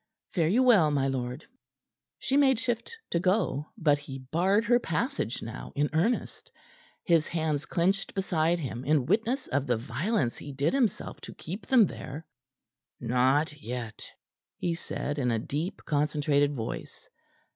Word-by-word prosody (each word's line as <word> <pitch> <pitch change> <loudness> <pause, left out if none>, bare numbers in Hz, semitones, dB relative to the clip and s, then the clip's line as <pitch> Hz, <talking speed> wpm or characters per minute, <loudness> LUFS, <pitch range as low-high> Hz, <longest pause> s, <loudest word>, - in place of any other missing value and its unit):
Fare 165 -4 +2
you 230 +10 +4
well, 205 -11 +6
my 140 -2 +1
lord." 130 +1 -3 0.7
She 270 - -1
made 270 -3 +5
shift 245 - -3
to 170 - +2
go, 180 -6 +1
but 150 -6 +3
he 140 -2 -8
barred 180 - +1
her 240 +2 +4
passage 190 - -2
now 110 - -7
in 145 +1 +1
earnest, 205 +10 0 0.5
his 165 -3 +3
hands 155 -3 -1
clenched 190 +4 0
beside 175 -3 +1
him 130 -6 -5
in 145 -2 +2
witness 225 - +1
of 140 +1 0
the 120 - +2
violence 130 - -1
he 145 - -7
did 140 +3 +1
himself 250 -8 0
to - - -9
keep 185 +7 -7
them 250 -5 +6
there. 155 -2 -7 0.7
"Not 130 +5 +1
yet," 115 -2 -6 0.5
he 175 - -1
said, 145 -3 -4
in 125 -3 +1
a 115 - +1
deep, 150 - -4
concentrated 145 -1 +1
voice. 115 -3 -6
155 Hz, 150 wpm, -28 LUFS, 135-195 Hz, 0.7 s, well